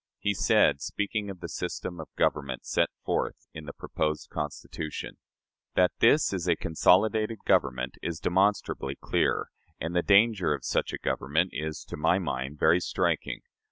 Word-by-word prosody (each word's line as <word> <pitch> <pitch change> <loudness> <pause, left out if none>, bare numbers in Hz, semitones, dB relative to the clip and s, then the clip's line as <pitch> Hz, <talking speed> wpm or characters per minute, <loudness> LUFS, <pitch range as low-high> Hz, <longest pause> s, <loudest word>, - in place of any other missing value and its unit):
He 105 - 0
said, 70 -6 +3
speaking 100 +3 -2
of 95 -2 -8
the 85 - -4
system 90 0 -5
of 80 - -7
government 70 -4 0
set - - +1 0.2
forth - - -2
in 80 -1 -8
the 70 - -6
proposed 75 +1 -3
Constitution: 75 +1 -5 0.6
"That 90 -1 +4
this 140 0 +4
is 90 -2 -2
a 85 - +4
consolidated 110 +8 +2
government 60 -3 +1
is 85 -2 -3
demonstrably 95 -7 +1
clear; - - 0 0.3
and 80 +2 -4
the 90 - +4
danger 100 -5 +4
of 65 - -10
such - - 0
a - - -3
government - - 0
is, 75 +2 -4
to - - -7
my 85 +4 +3
mind, 70 -5 -3
very 85 +4 +4
striking. - - -1
85 Hz, 160 wpm, -28 LUFS, 75-100 Hz, 0.6 s, That